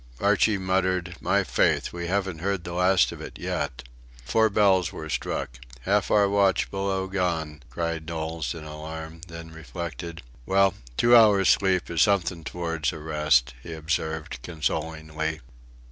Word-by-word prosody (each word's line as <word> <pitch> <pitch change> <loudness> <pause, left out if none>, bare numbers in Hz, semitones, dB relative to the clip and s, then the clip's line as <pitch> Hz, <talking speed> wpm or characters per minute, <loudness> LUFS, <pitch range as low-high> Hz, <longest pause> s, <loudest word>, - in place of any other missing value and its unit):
Archie 105 -2 +3
muttered: 95 -1 0
"My 100 +3 +2
faith! - - +1
we 85 0 -4
haven't 95 -2 -1
heard 95 0 -1
the 85 - -6
last 90 +1 +3
of - - -9
it - - -8
yet!" 70 -4 -3 0.4
Four 110 0 +3
bells 95 -4 +3
were 80 -1 -7
struck. - - -3 0.2
"Half 100 +9 +1
our 105 -1 +4
watch 100 -2 +2
below 95 -1 -1
gone!" 85 -6 -2
cried 85 -2 -3
Knowles 80 0 -3
in 80 - -8
alarm, 80 +1 -8
then 85 -1 -9
reflected. 85 0 -7 0.2
"Well, 95 0 +4 0.2
two 120 +1 +6
hours' 105 -5 +6
sleep 95 -2 +3
is 85 -2 +1
something 90 -4 +2
towards 80 -5 -2
a - - -7
rest," 75 -6 +2
he 85 - -8
observed, 80 -3 -3
consolingly. 80 0 -3
85 Hz, 145 wpm, -26 LUFS, 80-95 Hz, 0.4 s, two